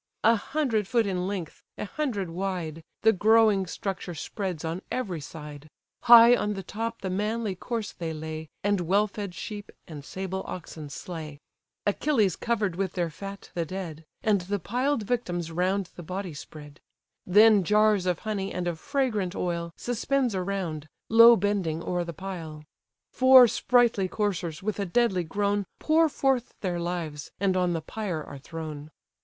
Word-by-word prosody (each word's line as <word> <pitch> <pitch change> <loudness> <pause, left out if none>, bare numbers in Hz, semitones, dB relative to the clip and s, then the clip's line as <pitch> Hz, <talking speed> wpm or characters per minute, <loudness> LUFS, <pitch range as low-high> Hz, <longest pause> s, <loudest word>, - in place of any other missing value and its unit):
A 230 +2 +6
hundred 225 -3 -1
foot 235 -1 +2
in 185 -2 -1
length, 190 -5 -5
a - - -3
hundred 205 - -3
wide, 175 -3 -3 0.2
The 220 0 +6
growing 215 -1 +4
structure 185 -1 -4
spreads 180 0 -4
on 165 +3 -3
every 190 -11 -2
side; 150 0 -9 0.4
High 235 0 +9
on 210 -3 -1
the 195 - -5
top 230 +4 -4
the 190 - -1
manly 210 +2 -1
corse 220 +3 -4
they 165 -2 -5
lay, 155 0 -6
And 205 -2 +2
well 195 +5 +3
fed 200 -3 -6
sheep 205 +3 -7 0.2
and 150 -4 -8
sable 190 +3 -4
oxen 160 -4 -7
slay: 155 -1 -7 0.5
Achilles 210 - +2
covered 210 -7 -1
with 190 -2 -1
their 175 -3 -1
fat 195 +5 -9
the 170 - -1
dead, 165 -2 -6 0.2
And 210 -4 +3
the 200 +3 -2
piled 245 - -1
victims 175 -8 -2
round 185 +2 0
the - - -8
body 185 +1 -5
spread; 150 0 -11 0.5
Then 210 +1 +6
jars 210 0 +3
of 180 -2 +1
honey, 200 -2 -2
and 180 -1 -3
of 170 -2 -3
fragrant 225 - -1
oil, 170 -1 -2
Suspends 245 +1 0
around, 180 -5 -3 0.2
low 230 +1 +9
bending 185 -6 -1
o'er 180 -1 -1
the 170 - -5
pile. 165 -4 -7 0.5
Four 260 -1 +8
sprightly 235 -3 +3
coursers, 185 -4 -2
with 215 0 -2
a 200 - 0
deadly 190 -2 +2
groan 200 +3 0
Pour 320 +1 +3
forth 270 -3 0
their 180 -3 -1
lives, 170 -4 -4
and 195 -1 +2
on 180 -1 +2
the 165 - -2
pyre 180 -3 -4
are 140 - -9
thrown. 155 0 -7
190 Hz, 160 wpm, -27 LUFS, 170-215 Hz, 0.5 s, High